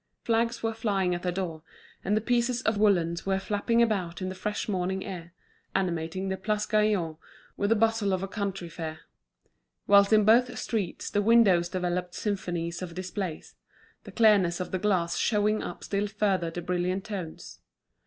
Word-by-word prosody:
Flags 230 +1 0
were 225 0 0
flying 200 -5 0
at 175 - -3
the 180 - -1
door, 175 -4 -4 0.4
and 210 +3 0
pieces 245 0 +1
of 225 - +1
woollens 170 -5 +2
were 195 0 +2
flapping 210 +4 +1
about 190 -7 -1
in 185 -1 -3
the - - -4
fresh 210 +3 -3
morning 190 -1 -1
air, 175 -3 -7 0.4
animating 180 0 -1
the 190 0 -2
Place 210 +2 -1
Gaillon 210 -7 +1 0.4
with 200 - 0
the 225 - +4
bustle 225 -2 +2
of 185 0 0
a - - -2
country 195 -3 -4
fair; 160 -1 -6 0.8
whilst 200 0 +6
in 215 -1 +5
both 245 +3 +4
streets 210 -7 -3
the 205 - +2
windows 200 -6 +5
developed 180 -1 -2
symphonies 175 -4 -3
of 175 -2 -6
displays, 185 -2 -5 0.5
the - - -10
clearness 200 -6 +4
of 180 - -4
the 185 - -1
glass 180 -4 +1
showing 210 0 +2
up - - -7
still 200 +1 -1
further 195 -4 0
the 175 +1 -6
brilliant 180 +2 -1
tones. 190 -7 -7
195 Hz, 170 wpm, -28 LUFS, 175-215 Hz, 0.8 s, whilst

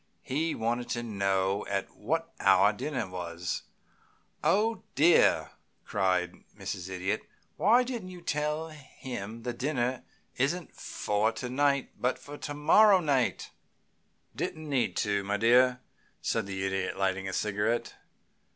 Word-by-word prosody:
"He 155 +5 -1
wanted 120 +2 -1
to 120 0 -2
know 100 -2 0
at 100 -1 -2
what 165 +8 -2
hour 100 +2 +5
dinner 135 +2 -3
was." 90 -1 -4 0.8
"Oh, 225 +3 +2
dear!" 160 +5 +5 0.3
cried 90 -3 0
Mrs. 95 -2 -5
Idiot. 95 +3 -1 0.3
"Why 235 +5 +5
didn't 240 -7 -5
you 180 -1 -9
tell 150 0 -1
him 120 -7 -8
the 120 0 -2
dinner 125 -1 -1 0.4
isn't 155 +6 -1
for 105 +2 0
to 125 +2 -5
night, 140 0 +1
but 125 +1 +1 0.3
to 145 - -4
morrow 195 +7 +6
night?" 140 -7 0 0.8
"Didn't 155 -1 -4
need 135 -4 0
to, 100 -1 0
my 100 +1 -1
dear," 125 +3 +4 0.4
said 110 -3 -1
the 95 -1 -3
Idiot, 95 0 -2
lighting 95 0 0
a - - -5
cigarette. 105 +4 0
120 Hz, 130 wpm, -29 LUFS, 100-150 Hz, 0.8 s, morrow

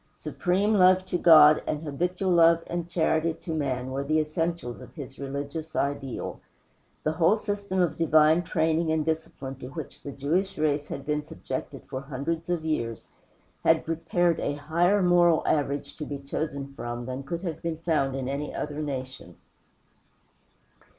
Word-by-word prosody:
Supreme 195 +4 0
love 185 -1 +5
to 185 - -1
God 155 -3 +8
and 150 +1 -2
habitual 180 +5 -1
love 170 -1 +5
and 175 0 -4
charity 165 -1 +1
to 165 - -6
man 130 -4 -2
were 135 +1 -2
the 155 +3 +1
essentials 155 - -2
of - - -13
his 140 -4 -9
religious 140 +3 -5
ideal. 140 -2 -2 0.6
The 155 - +1
whole 165 +6 +3
system 200 -3 -3
of 160 -3 -1
divine 155 0 +5
training 160 -1 +1
and 160 -1 +1
discipline 155 -4 -3
to 125 - -7
which 150 +2 -8
the 140 - -6
Jewish 165 +9 -1
race 150 -1 0
had 140 - -6
been 150 0 0
subjected 150 - -6
for 130 - -5
hundreds 150 +5 -4
of 170 -3 -1
years 115 -8 -2 0.5
had 160 -1 +3
prepared 165 +1 +1
a 145 - -1
higher 170 +7 +2
moral 175 -2 +4
average 140 -1 0
to 150 - -4
be 145 - -4
chosen 140 0 -4
from 120 -2 -5
than 130 +1 -4
could 170 +6 -5
have 170 -4 -4
been 165 -1 -3
found 155 -5 0
in 130 -1 -3
any 140 +2 -3
other 150 0 -3
nation. 130 - -6
155 Hz, 165 wpm, -27 LUFS, 140-170 Hz, 0.6 s, God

